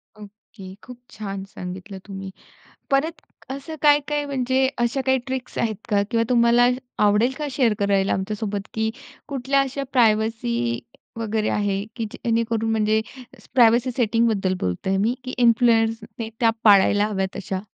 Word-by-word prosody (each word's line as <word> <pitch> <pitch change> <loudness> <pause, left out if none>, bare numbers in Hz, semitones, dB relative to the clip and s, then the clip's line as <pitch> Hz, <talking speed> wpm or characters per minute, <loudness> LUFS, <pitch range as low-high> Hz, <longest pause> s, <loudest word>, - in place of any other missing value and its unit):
Okay, 205 -2 -13
खूप 250 -1 -11
छान 195 -2 -6
सांगितलं 190 +1 -8
तुम्ही. 195 -1 -7 0.6
परत 285 +4 +2 0.4
असं 280 +4 -6
काय-काय 295 0 +3
म्हणजे 265 -1 +1
अशा 240 +3 0
काही 265 0 +3
ट्रिक्स 260 -1 -5
आहेत 220 -2 0
का? 205 -3 +2
किंवा 230 0 +2
तुम्हाला 240 0 +5 0.4
आवडेल 210 +5 +3
का, 300 - -3
की 290 - -3
शेअर 235 -6 +3
करायला 200 -1 +1
आमच्यासोबत 205 +1 -3
की 220 0 0 0.4
कुठल्या 275 0 +1
अशा 275 +1 -2
प्रायव्हसी 215 - +1 0.4
वगैरे 220 -1 -1
आहे, 200 -1 0
की 230 - -2
जेणेकरून 230 -2 -1
म्हणजे 220 0 +2 0.5
प्रायव्हसी 240 +1 +5
सेटिंगबद्दल 220 -5 +1
बोलत 90 - -3
आहे 190 - +2
मी, 215 +5 +1
की 255 - -5
इन्फ्लुएन्सर्सने 230 -1 +2
त्या 230 -2 +5
पाळायला 205 0 +5
हव्यात 195 -2 -3
अशा? 190 -1 -4
225 Hz, 140 wpm, -23 LUFS, 200-250 Hz, 0.6 s, तुम्हाला